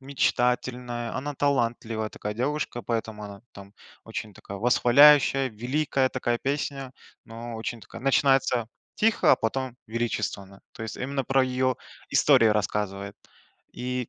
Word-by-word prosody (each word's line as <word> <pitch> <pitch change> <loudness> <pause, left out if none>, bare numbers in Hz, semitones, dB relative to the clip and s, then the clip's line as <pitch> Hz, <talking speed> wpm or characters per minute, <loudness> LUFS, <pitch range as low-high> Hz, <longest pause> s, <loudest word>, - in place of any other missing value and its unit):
мечтательная, 125 -2 -1
она 145 +2 -4
талантливая 120 -5 0
такая 105 0 -5
девушка, 130 +1 -2
поэтому 110 -2 -3
она 100 0 -10
там 100 0 -12 0.3
очень 110 -1 -6
такая 100 +1 -9
восхваляющая, 135 +4 +5
великая 130 +4 0
такая 120 -2 -1
песня, 135 -1 -3 0.3
но 115 +1 -8
очень 115 +1 -5
такая: 105 - -11
начинается 135 -4 +3 0.3
тихо, 225 0 +3
а - - +5
потом 130 +1 -2
величественно. 105 -4 -3
То - - -9
есть 110 -2 -5
именно 135 +1 -3
про 135 +2 +3
ее 130 0 0 0.3
истории 115 - +5
рассказывает. 105 -1 -1 0.6
И, 125 -1 -3
120 Hz, 130 wpm, -26 LUFS, 110-135 Hz, 0.6 s, восхваляющая